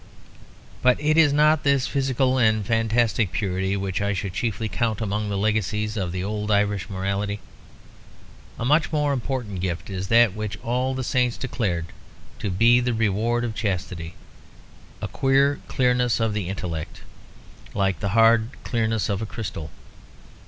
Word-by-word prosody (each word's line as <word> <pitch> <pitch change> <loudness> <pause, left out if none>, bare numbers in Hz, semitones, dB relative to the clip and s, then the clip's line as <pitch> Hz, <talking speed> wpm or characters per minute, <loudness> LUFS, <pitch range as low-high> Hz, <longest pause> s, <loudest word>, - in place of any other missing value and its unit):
But 125 -1 +4
it 150 +1 +2
is 160 -3 +5
not 150 +1 +4
this 140 -2 +3
physical 130 -1 +1
and 110 -3 +3
fantastic 115 -2 +1
purity 95 +1 -1
which 95 -1 -2
I 100 0 0
should 100 -1 -3
chiefly 110 +2 -2
count 110 +1 -1
among 105 -1 -2
the 100 - -1
legacies 105 +1 0
of 95 -5 -2
the 90 0 -3
old 105 +1 -3
Irish 100 -3 +1
morality. 100 +2 -2 1.2
A 115 - -3
much 150 +5 +3
more 150 -2 +1
important 120 -7 -3
gift 90 +1 -3
is 95 0 -4
that 115 -2 +5
which 110 0 -4
all 125 +3 0
the 130 - -3
saints 125 -1 +1
declared 100 -10 -2 0.5
to 105 - -2
be 115 +6 +5
the 125 -1 0
reward 115 +2 +1
of 115 -2 -2
chastity: 90 -5 -3 0.9
a - - -1
queer 140 +1 +2
clearness 125 -2 +1
of 115 -2 +1
the 100 -4 -3
intellect, 85 -4 -5 0.7
like 95 -4 +1
the 100 - -2
hard 115 0 +5
clearness 110 -2 0
of 100 -1 -2
a 110 - -3
crystal. 85 -8 -6
110 Hz, 155 wpm, -24 LUFS, 100-125 Hz, 1.2 s, is